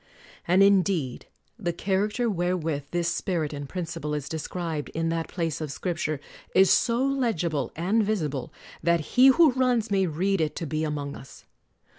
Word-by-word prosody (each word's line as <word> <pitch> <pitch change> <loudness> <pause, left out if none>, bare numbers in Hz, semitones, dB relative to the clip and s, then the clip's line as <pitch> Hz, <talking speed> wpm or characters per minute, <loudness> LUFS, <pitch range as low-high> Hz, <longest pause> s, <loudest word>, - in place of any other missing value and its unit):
And 185 +3 +5
indeed 185 -9 +2 0.3
the 175 -5 -1
character 205 +7 0
wherewith 175 -7 -1
this 175 -1 -1
spirit 170 -3 -1
and 145 -1 -6
principle 165 -4 -4
is 145 -2 -4
described 160 0 -4
in 165 0 0
that 165 0 -2
place 165 -4 -3
of 150 -3 -4
Scrip 175 +3 -3
ture 155 -3 -2 0.4
is 190 0 +6
so 240 +2 +3
legible 220 - 0
and 190 +8 +1
visible 155 - -2 0.3
that 170 0 +2
he 255 +1 +7
who 300 +2 +6
runs 250 -4 +1
may 195 -2 +2
read 185 +4 0
it 155 -1 -1
to 165 - -4
be 155 +1 -2
among 145 -2 -3
us. 135 - -13
170 Hz, 165 wpm, -26 LUFS, 155-200 Hz, 0.4 s, he